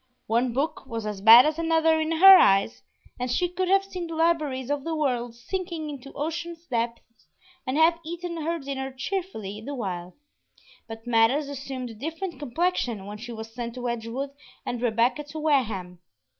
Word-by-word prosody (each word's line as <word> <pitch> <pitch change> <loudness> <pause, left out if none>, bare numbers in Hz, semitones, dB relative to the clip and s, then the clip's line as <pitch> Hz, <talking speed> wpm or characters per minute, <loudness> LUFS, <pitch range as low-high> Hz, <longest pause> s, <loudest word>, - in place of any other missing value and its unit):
One 235 +3 +1
book 275 +2 -2
was 230 -3 -5
as 210 -2 -4
bad 230 +4 +10
as 310 +1 0
another 325 -1 +3
in 315 +1 0
her 385 +4 +10
eyes, 195 - +4 0.4
and 250 0 -2
she 355 +8 +1
could 360 +1 -2
have 390 +1 +4
seen 365 -3 -6
the 330 - -6
libraries 305 -6 0
of 290 -1 -1
the 330 +1 -2
world 245 -6 -1
sinking 335 +3 -4
into 275 -1 -9
ocean 335 +3 -4
depths 230 -1 -4 0.4
and 260 +3 0
have 330 +1 +4
eaten 340 +1 -5
her 335 +2 -1
dinner 270 -2 -5
cheerfully 260 - -4
the 280 +5 -6
while; 180 -6 -5 0.7
but 225 0 -9
matters 240 +5 +3
assumed 265 -3 -6
a - - -9
different 325 - -5
complexion 280 - -1
when 210 +1 -8
she 240 +2 -8
was 225 0 -8
sent 235 0 -5
to 250 -1 -4
Edgewood 235 +4 -3 0.3
and 240 -1 -3
Rebecca 240 +5 +1
to 295 +2 -9
Wareham. 220 - 0
270 Hz, 175 wpm, -26 LUFS, 230-325 Hz, 0.7 s, bad